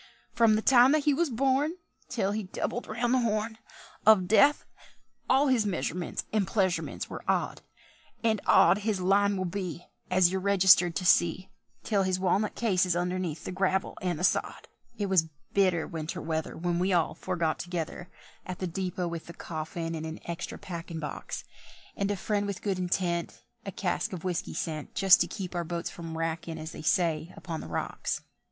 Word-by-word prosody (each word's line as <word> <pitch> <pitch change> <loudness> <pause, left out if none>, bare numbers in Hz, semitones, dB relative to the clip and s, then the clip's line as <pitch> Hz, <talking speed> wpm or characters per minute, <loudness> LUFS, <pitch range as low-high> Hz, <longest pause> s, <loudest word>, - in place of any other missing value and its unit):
"Frum 225 -2 +4
the 215 - 0
time 255 +1 +6
that 310 -1 +2
he 295 - +3
was 335 +3 +1
born 270 +5 +1 0.4
Till 200 -5 0
he 215 +1 -1
doubled 210 +5 -4
round 235 +3 0
the 260 - +4
Horn 220 -1 -1 0.4
Of 205 -4 +6
Death, 280 +8 +5 0.6
all 270 +2 +5
his 255 -5 +3
measurements 180 -3 -2
and 210 -3 +2
pleasurements 185 -4 -1
were - - -7
odd; - - 0 0.6
And 220 -3 +2
odd 200 - +6
his 210 -2 -1
line 200 +2 +3
will 185 - -1
be, 175 -2 -4 0.2
As 185 -1 +4
you're 190 0 -1
registered 190 -3 +5
to 185 - -2
see, 175 +2 +3 0.3
Till 205 -3 +1
his 185 -1 0
walnut 195 +3 +1
case 195 -6 +2
is 180 -2 +1
underneath 175 -3 -2
the - - -4
gravel 190 0 0
and 180 -3 -1
the 175 - -5
sod." - - 0 0.3
It 205 - -1
was 185 -5 +2 0.2
bitter 185 -5 +3
winter 160 -1 -5
weather 160 0 -3
When 175 0 -1
we 185 +2 +1
all 170 -3 +2
four 185 - -4
got 165 -2 0
together 175 0 -4 0.3
At 180 -1 -6
the 185 - -3
depôt 180 0 -3
with 170 -1 -6
the 170 - -8
coffin 165 +1 -5
in 160 -1 -4
an 160 0 -6
extra 170 +1 -5
packin' 170 -2 -6
box; 150 - -5 0.5
And 200 0 -1
a 205 - -1
friend 205 +2 -1
with 200 -2 -5
good 195 -3 -1
intent, 175 -1 -1 0.2
A - - -2
cask 180 0 -2
of 175 - -6
whisky 180 -2 -3
sent, 155 -3 -4
Just 195 -3 +6
to 175 - +2
keep 185 +1 -6
our 175 -1 -1
boats 170 +1 -4
from 165 -1 -7
wrackin', 165 0 -3
as 160 0 -6
they - - -8
say, 165 0 +1
upon 165 -3 -5
the - - -8
rocks. - - -3
185 Hz, 190 wpm, -29 LUFS, 170-205 Hz, 0.6 s, time